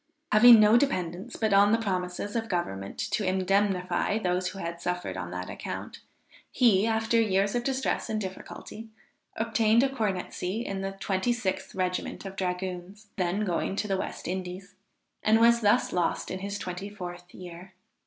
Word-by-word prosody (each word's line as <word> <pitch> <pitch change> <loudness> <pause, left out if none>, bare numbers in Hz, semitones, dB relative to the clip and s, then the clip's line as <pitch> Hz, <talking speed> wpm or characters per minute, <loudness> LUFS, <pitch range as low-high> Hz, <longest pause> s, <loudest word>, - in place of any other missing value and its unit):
Having 230 +2 +9
no 215 +2 +6
dependence 185 -9 -1
but 220 -2 0
on 200 +1 +6
the 225 - +4
promises 190 -1 -3
of 225 -1 -2
government 100 - -3
to 205 - 0
indemnify 190 0 +1
those 180 -3 0
who 185 +2 -6
had 170 -2 -5
suffered 180 0 -3
on - - -5
that - - -5
account - - -6 0.5
he, 220 -5 +4
after 225 +1 +2
years 200 -2 +1
of 240 -1 0
distress 265 +1 -1
and 215 -1 -1
difficulty, 210 +3 -8 0.5
obtained 225 +1 +3
a 275 - +2
cornetcy 210 -3 -2
in 195 -1 -3
the 195 0 -3
26th 190 0 -2
regiment 185 +1 -2
of 195 0 -7
dragoons, 185 +2 -4
then 185 +2 0
going 185 +1 -1
to 210 - -2
the 195 - 0
West 190 - -5
Indies, 185 +2 -5 0.5
and 220 +1 +4
was 235 +1 +5
thus 210 +3 +3
lost 175 -2 -1
in 185 - -4
his 200 +1 -4
twenty 185 +1 -5
fourth 175 -3 -8
year. 180 +1 -10
195 Hz, 165 wpm, -28 LUFS, 180-220 Hz, 0.5 s, Having